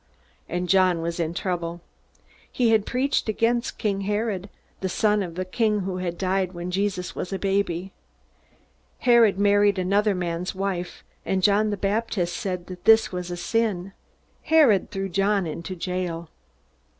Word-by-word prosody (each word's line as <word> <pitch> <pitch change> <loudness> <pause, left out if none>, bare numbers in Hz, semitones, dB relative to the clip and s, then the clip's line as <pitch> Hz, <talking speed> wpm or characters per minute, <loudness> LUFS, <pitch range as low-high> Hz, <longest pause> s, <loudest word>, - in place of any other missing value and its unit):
And 180 +1 -2
John 180 -2 +3
was 170 +1 -3
in 165 0 -2
trouble. 175 -2 -3 0.7
He 240 -3 +2
had 215 -2 +3
preached 260 -2 0
against 235 +3 0
King 200 -3 -1
Herod, 205 -1 -2 0.3
the 190 - -2
son 210 +2 +2
of 175 -4 -5
the 185 +1 -3
king 210 +2 +1
who 185 -1 -3
had 175 -2 -3
died 190 -1 0
when 175 +1 -5
Jesus 190 -1 -1
was 180 - -4
a 195 - -1
baby. 195 -2 -1 1.1
Herod 235 -5 +5
married 205 0 +3
another 200 +3 +2
man's 175 +1 -3
wife, 190 -2 -3 0.2
and 190 -1 -1
John 210 +2 +4
the 205 - -2
Baptist 195 -3 -1
said 180 -3 -3
that 180 -1 -10
this 225 0 +6
was 180 -1 -4
a 175 - -4
sin. 195 -3 -1 0.5
Herod 285 - +4
threw 195 0 -3
John 195 +1 +1
into 165 +3 -5
jail. 175 -2 -4
195 Hz, 155 wpm, -24 LUFS, 180-210 Hz, 1.1 s, this